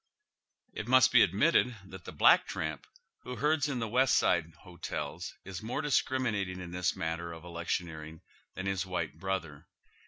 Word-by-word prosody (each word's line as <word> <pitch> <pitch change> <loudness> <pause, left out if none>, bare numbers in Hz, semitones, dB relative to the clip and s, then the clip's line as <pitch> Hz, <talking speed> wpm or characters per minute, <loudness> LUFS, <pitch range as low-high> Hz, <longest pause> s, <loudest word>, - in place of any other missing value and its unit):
It - - -5
must 130 +1 +6
be 125 - +7
admitted 125 - +3
that 95 -2 -11
the - - -7
black - - +5
tramp 80 -2 -4 0.3
who 125 - -6
herds 150 +3 +1
in 135 - -2
the 115 -2 -2
West 125 +4 +3
Side 85 -1 +2
" - - -23
hotels 90 -3 -6
" - - -52
is 95 -1 -6
more 115 +7 -3
discriminating 115 -9 0
in 85 -1 -7
this 90 0 0
matter 85 +1 -3
of 80 0 -10
electioneering 85 -2 -4 0.3
than 95 - -5
his 95 -1 0
white 85 -4 -4
brother. 85 -6 -4
95 Hz, 175 wpm, -31 LUFS, 85-125 Hz, 0.3 s, be